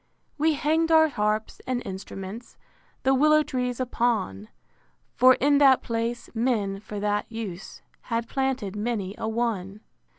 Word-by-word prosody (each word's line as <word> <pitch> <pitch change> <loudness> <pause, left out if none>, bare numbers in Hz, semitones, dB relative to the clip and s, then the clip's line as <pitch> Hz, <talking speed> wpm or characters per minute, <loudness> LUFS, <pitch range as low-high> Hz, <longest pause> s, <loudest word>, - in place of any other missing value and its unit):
II. - - -44
We 315 +1 +3
hang'd 320 +3 +1
our 315 -1 +6
harps 215 -3 -2
and 250 -1 -1
instruments 195 +3 -8 0.5
The 265 - +3
willow 305 +3 +5
trees 250 -3 -3
upon: 230 - -1 0.7
For 255 +1 +6
in 285 +1 +3
that 270 -2 +5
place, 230 +1 -3
men, 220 -5 0
for 210 0 -7
that 205 +2 -1
use, 215 -5 -7 0.2
Had 230 -1 -2
planted 265 -7 -2
many 210 -3 -2
a 220 - -2
one. 215 -4 -2
235 Hz, 140 wpm, -26 LUFS, 210-260 Hz, 0.7 s, our